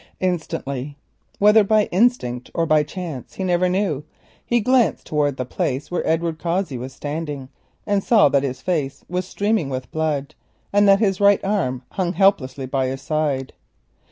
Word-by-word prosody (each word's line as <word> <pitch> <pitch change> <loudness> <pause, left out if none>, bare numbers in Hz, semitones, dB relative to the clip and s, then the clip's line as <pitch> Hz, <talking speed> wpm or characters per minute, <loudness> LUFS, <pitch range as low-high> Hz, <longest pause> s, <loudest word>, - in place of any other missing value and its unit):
Instantly, 145 -6 -3 0.4
whether 210 +1 +6
by 215 +1 +3
instinct 175 - +1
or 165 - +1
by 155 -1 +4
chance 155 -4 -7
he 190 - -4
never 180 0 +2
knew, 180 -7 0 0.4
he 240 - +1
glanced 250 +1 +2
towards 145 -3 0
the 130 - -2
place 130 +4 -3
where 180 - -1
Edward 165 0 0
Cossey 170 -6 -2
stood, 145 -1 -5 0.4
and 200 -2 +1
saw 220 -9 +5
that 140 0 +3
his 130 -2 -4
face 150 -7 -2
was 180 +1 -3
streaming 205 -7 0
with 130 -1 -5
blood 155 -2 -2 0.4
and 205 0 +5
that 195 0 +7
his 195 -2 +1
right 200 0 +5
arm 150 -12 -1
hung 180 -2 -1
helpless 185 -8 +2
by 130 -1 -2
his 135 +1 -5
side. 145 -3 -1
160 Hz, 160 wpm, -21 LUFS, 135-195 Hz, 0.4 s, that